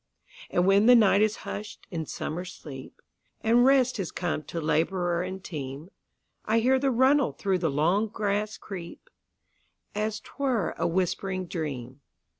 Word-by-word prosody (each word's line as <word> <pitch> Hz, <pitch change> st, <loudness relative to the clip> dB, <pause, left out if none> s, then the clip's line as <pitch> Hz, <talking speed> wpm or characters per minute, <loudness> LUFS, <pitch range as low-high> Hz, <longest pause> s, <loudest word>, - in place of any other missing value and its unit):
And 175 Hz, -, +2 dB
when 200 Hz, +3 st, +5 dB
the 250 Hz, -, +9 dB
night 205 Hz, -3 st, +5 dB
is 215 Hz, 0 st, +2 dB
hush'd 205 Hz, 0 st, -7 dB
in 160 Hz, -4 st, -4 dB
summer 170 Hz, +4 st, -4 dB
sleep, 145 Hz, -7 st, -10 dB, 0.4 s
And 235 Hz, +2 st, +4 dB
rest 260 Hz, -2 st, +4 dB
has 190 Hz, -6 st, -3 dB
come 175 Hz, -3 st, -2 dB
to 170 Hz, -, -5 dB
laborer 170 Hz, +3 st, +1 dB
and 185 Hz, +1 st, -5 dB
team,I 155 Hz, +8 st, -6 dB
hear 255 Hz, +3 st, +3 dB
the 275 Hz, 0 st, +1 dB
runnel 265 Hz, +2 st, +3 dB
through 190 Hz, -2 st, 0 dB
the 165 Hz, -2 st, +1 dB
long 170 Hz, +10 st, +2 dB
grass 210 Hz, 0 st, -2 dB
creep, 195 Hz, -, -9 dB, 0.8 s
As 215 Hz, +1 st, -2 dB
't -, -, -18 dB
were 250 Hz, -10 st, 0 dB
a -, -, +2 dB
whispering 185 Hz, +1 st, -1 dB
dream. 140 Hz, -6 st, -5 dB
190 Hz, 150 wpm, -27 LUFS, 165-220 Hz, 0.8 s, the